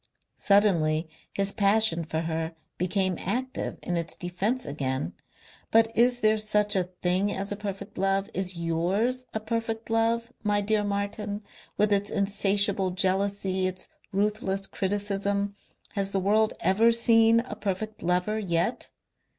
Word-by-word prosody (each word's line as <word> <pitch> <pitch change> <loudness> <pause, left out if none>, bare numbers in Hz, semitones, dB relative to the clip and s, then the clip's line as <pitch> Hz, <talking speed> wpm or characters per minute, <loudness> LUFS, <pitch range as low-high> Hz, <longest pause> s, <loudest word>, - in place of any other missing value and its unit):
Suddenly 170 -6 +3 0.2
his 195 0 0
passion 200 -5 +3
for 160 0 -3
her 165 0 -3 0.2
became 185 0 0
active 255 +7 -3
in 175 - -1
its 170 -1 -1
defence 195 +8 -2
again. 130 - -3 0.6
"But 225 0 +3
is 245 +1 +3
there 215 0 +3
such 210 -1 +3
a 180 -2 0
thing 185 +3 +2
as 195 +1 -3
a - - -1
perfect 200 -1 -7
love? 195 +1 +1
Is 185 -1 -2
YOURS 190 +10 -1
a - - 0
perfect 225 0 -3
love, 230 +1 +1
my 205 -1 +1
dear 210 +1 +1
Martin, 205 +1 -3 0.3
with 210 0 +3
its 200 0 +1
insatiable 200 -1 +3
jealousy, 190 0 0
its 185 0 -6 0.2
ruthless 195 -1 -1
criticism? 200 +1 -1 0.4
Has 200 -2 -2
the 195 - +2
world 215 +3 +2
ever 220 +5 +4
seen 230 0 +5
a 230 -3 -8
perfect 210 +1 -4
lover 180 +5 0
yet? 175 +3 -1
200 Hz, 140 wpm, -27 LUFS, 185-215 Hz, 0.6 s, seen